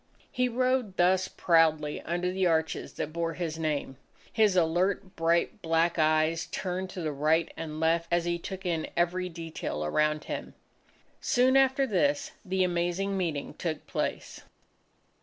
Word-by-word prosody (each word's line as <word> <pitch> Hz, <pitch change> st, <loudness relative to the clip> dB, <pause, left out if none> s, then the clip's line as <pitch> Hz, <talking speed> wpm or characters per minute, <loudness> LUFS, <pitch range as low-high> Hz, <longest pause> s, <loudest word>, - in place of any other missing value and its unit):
He 250 Hz, -2 st, +1 dB
rode 250 Hz, -4 st, 0 dB
thus 185 Hz, +1 st, +3 dB
proudly 160 Hz, -3 st, +2 dB
under 175 Hz, +2 st, -2 dB
the 185 Hz, 0 st, +1 dB
arches 160 Hz, -1 st, 0 dB
that 155 Hz, -, -4 dB
bore 165 Hz, 0 st, -1 dB
his 165 Hz, -2 st, -4 dB
name. 150 Hz, -4 st, -2 dB, 0.4 s
His 215 Hz, -4 st, +3 dB
alert, 180 Hz, +3 st, +1 dB
bright, 165 Hz, +1 st, +1 dB
black 165 Hz, +1 st, +1 dB
eyes 155 Hz, +1 st, +2 dB
turned 185 Hz, 0 st, -3 dB
to 185 Hz, -1 st, -6 dB
the 155 Hz, -2 st, -1 dB
right 155 Hz, +3 st, +1 dB
and 155 Hz, -1 st, -6 dB
left 165 Hz, +1 st, +2 dB
as 170 Hz, 0 st, +1 dB
he 170 Hz, 0 st, -1 dB
took 190 Hz, +2 st, -7 dB
in 165 Hz, -3 st, -1 dB
every 180 Hz, +1 st, +1 dB
detail 165 Hz, -, -5 dB
around 150 Hz, -, +1 dB
him. -, -, -6 dB, 0.6 s
Soon 255 Hz, +2 st, +3 dB
after 270 Hz, 0 st, +4 dB
this, 285 Hz, +6 st, +1 dB
the 190 Hz, -1 st, 0 dB
Amazing 175 Hz, +2 st, 0 dB
Meeting 165 Hz, -7 st, -2 dB
took 160 Hz, -3 st, -4 dB
place. -, -, -3 dB
170 Hz, 150 wpm, -28 LUFS, 160-190 Hz, 0.6 s, after